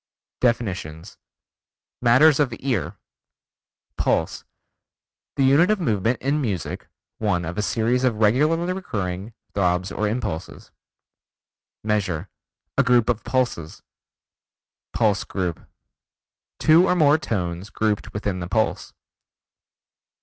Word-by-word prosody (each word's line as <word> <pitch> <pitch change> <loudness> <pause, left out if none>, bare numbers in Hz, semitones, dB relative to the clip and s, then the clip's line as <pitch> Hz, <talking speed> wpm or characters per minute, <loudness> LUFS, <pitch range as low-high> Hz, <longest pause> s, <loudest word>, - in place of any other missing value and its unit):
DEFINITIONS 100 -7 -2 0.8
Matters 130 +5 +5
of 140 -4 +2
Ear 130 -8 -2 1.0
Pulse: - - 0 0.9
The 135 - +1
unit 140 +8 +5
of 215 -1 +2
movement 115 - 0
in 145 +3 +1
music, 100 - -3 0.3
one 95 -5 0
of 85 +2 -5
a - - -1
series 115 +4 0
of 125 -3 +2
regularly 150 +12 +2
recurring 100 - -4 0.2
throbs 90 -1 0
or 105 - -1
impulses. 105 -7 -4 1.1
Measure: 100 -5 -1 0.5
A - - +6
group 125 -2 +3
of 115 -2 0
pulses. 125 -12 -2 1.1
Pulse 105 -3 +1
Group: 90 -4 -4 0.9
Two 165 +4 +5
or 180 - +2
more 155 -2 +4
tones 90 - -3
grouped 110 -2 -1
within 100 -2 -3
the 85 - -5
pulse. 110 +3 -1
110 Hz, 105 wpm, -23 LUFS, 95-130 Hz, 1.1 s, A